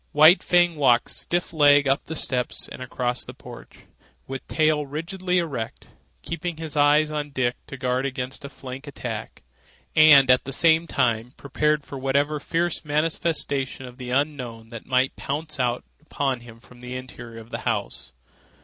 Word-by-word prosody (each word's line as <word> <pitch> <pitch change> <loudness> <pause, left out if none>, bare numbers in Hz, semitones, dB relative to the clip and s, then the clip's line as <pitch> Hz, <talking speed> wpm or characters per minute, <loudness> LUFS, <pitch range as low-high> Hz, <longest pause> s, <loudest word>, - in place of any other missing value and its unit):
White 155 +5 +7
Fang 175 -2 +3
walked 125 -4 +3
stiff 175 0 -2
legged 145 -2 +5
up 135 +1 +1
the 160 - -6
steps 125 -4 0
and - - -10
across 125 -1 -2
the - - -10
porch, - - -13 0.4
with 135 0 -7
tail 155 -1 +2
rigidly 180 +6 -2
erect, 140 -10 -3 0.3
keeping 170 0 -4
his 160 -2 -6
eyes 150 +1 +4
on 150 -1 -3
Dick 130 -3 0
to 140 - -8
guard 130 +1 0
against 130 +1 -5
a 140 - -6
flank 135 +1 -9
attack, 145 - -6 0.5
and 145 -4 +8
at 125 - +3
the 135 - -5
same 165 +3 +3
time 120 -4 0
prepared 150 +2 0
for 140 - -8
whatever 140 +3 +1
fierce 170 +3 -1
manifestation 150 -3 0
of 125 +1 -12
the 125 -1 -6
unknown 125 -5 -2
that 115 -2 -9
might 130 0 +1
pounce 150 +1 -4
out 120 -1 0 0.2
upon 140 -4 -2
him 120 -1 -14
from 125 +1 -18
the 125 +1 -7
interior 120 -3 -9
of 115 +1 -14
the - - -4
house. 60 0 -3
140 Hz, 165 wpm, -24 LUFS, 125-155 Hz, 0.5 s, and